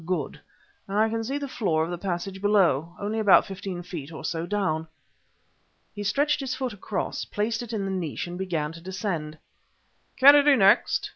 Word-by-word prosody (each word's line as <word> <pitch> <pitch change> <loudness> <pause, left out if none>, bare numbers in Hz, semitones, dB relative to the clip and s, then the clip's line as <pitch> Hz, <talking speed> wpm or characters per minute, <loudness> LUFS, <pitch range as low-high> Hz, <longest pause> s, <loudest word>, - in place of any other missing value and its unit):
Good! 170 -4 -3 0.5
I 215 +3 +2
can 225 0 -2
see 270 +5 -2
the 285 -1 -4
floor 175 -11 0
of 165 - -4
the 175 - -3
passage 190 +1 -4
below; 175 -6 +2
only 210 +2 -2
about 205 -3 +6
fifteen 190 -2 -6
feet 165 -4 -7
or 160 - -8
so 165 -1 -3
down." 180 -6 -1 1.1
He 205 - -7
stretched 285 +9 +1
his 270 -3 -3
foot 260 -3 -3
across, 205 0 -4
placed 225 +3 -2
it 240 -2 -7
in 210 -3 -2
the 195 - -2
niche 175 -6 -3
and 175 0 -7
began 170 -5 -2
to 165 0 -11
descend. 175 -4 -4 0.8
"Kennedy 285 +1 +7
next!" 195 -5 +3
195 Hz, 180 wpm, -26 LUFS, 170-220 Hz, 1.1 s, Kennedy